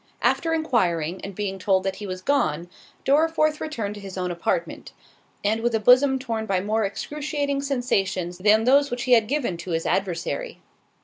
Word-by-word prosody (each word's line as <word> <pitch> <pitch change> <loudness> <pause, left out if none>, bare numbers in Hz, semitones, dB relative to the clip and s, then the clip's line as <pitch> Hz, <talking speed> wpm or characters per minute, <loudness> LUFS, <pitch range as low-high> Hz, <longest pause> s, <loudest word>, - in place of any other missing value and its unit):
After 330 - +2
enquiring, 185 - 0
and 195 -1 -7
being 195 -1 -3
told 190 -1 +2
that 190 -1 -2
he 205 - -6
was 185 0 -6
gone, 175 - 0 0.4
Dorriforth 310 +1 +2
returned 225 -10 -3
to 205 - -10
his 195 -1 -8
own 180 -1 -2
apartment; 175 - -3 0.5
and 220 +2 +1
with 235 0 +1
a - - +2
bosom 255 +5 +5
torn 230 -4 -4
by 190 -3 +1
more 215 +3 0
excruciating 285 +6 -3
sensations 195 -10 -1
than 215 +3 +4
those 280 +4 +4
which 245 -1 -3
he 255 - -2
had 225 -3 +5
given 255 - -1
to 180 - -8
his 165 -1 -1
adversary. 195 - -2
220 Hz, 180 wpm, -24 LUFS, 190-275 Hz, 0.5 s, bosom